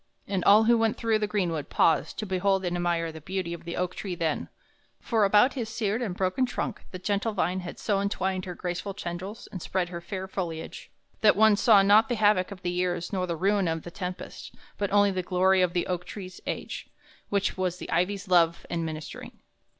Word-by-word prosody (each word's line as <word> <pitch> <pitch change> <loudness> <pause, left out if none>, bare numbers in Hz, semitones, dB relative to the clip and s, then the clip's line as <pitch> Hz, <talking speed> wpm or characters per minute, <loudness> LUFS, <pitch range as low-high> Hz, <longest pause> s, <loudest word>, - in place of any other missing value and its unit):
And 195 -3 -1
all 210 +2 +7
who 235 +1 +4
went 225 -1 +1
through 225 -2 +1
the 210 - 0
greenwood 175 -8 -1
paused 160 -3 +2
to 215 - -3
behold 190 0 +1
and 175 0 -1
admire 170 -1 0
the 160 0 -10
beauty 185 +1 -3
of 170 - -9
the 170 - -4
oak 180 0 -1
tree 190 -3 -5
then; 160 -3 -2 0.5
for 220 -4 +2
about 210 +6 +5
his 235 -5 -4
seared 220 0 -1
and 200 -7 -2
broken 190 +7 +1
trunk 245 -2 -4
the 185 - -7
gentle 205 +4 -1
vine 180 -1 0
had 180 -1 -7
so 200 -2 0
entwined 190 -2 -1
her 180 -1 -6
graceful 180 +3 -4
tendrils 190 +2 -6
and 185 - -6
spread 180 0 -1
her 170 -1 -6
fair 190 +2 -5
foliage, 170 -4 -5 0.3
that 215 - +6
one 215 +1 +6
saw 210 -1 +6
not 210 +3 +5
the 240 - +1
havoc 205 -4 +3
of 190 -2 -10
the 175 - -1
years 180 0 -2
nor 185 -1 0
the 170 - -2
ruin 195 +1 +2
of 165 -1 -2
the 175 - -8
tempest, 180 +1 -7 0.2
but 200 -1 -1
only 205 0 +4
the 185 -1 -1
glory 185 +1 +3
of 180 -1 +2
the 175 - 0
oak 180 -1 -2
tree's 185 -2 -9
age, - - -5 0.4
which 200 -1 0
was 185 -1 -1
the - - -8
ivy's 190 +4 0
love 170 -2 +3
and 170 -1 -1
ministering. 155 -1 -7
185 Hz, 215 wpm, -27 LUFS, 175-205 Hz, 0.5 s, all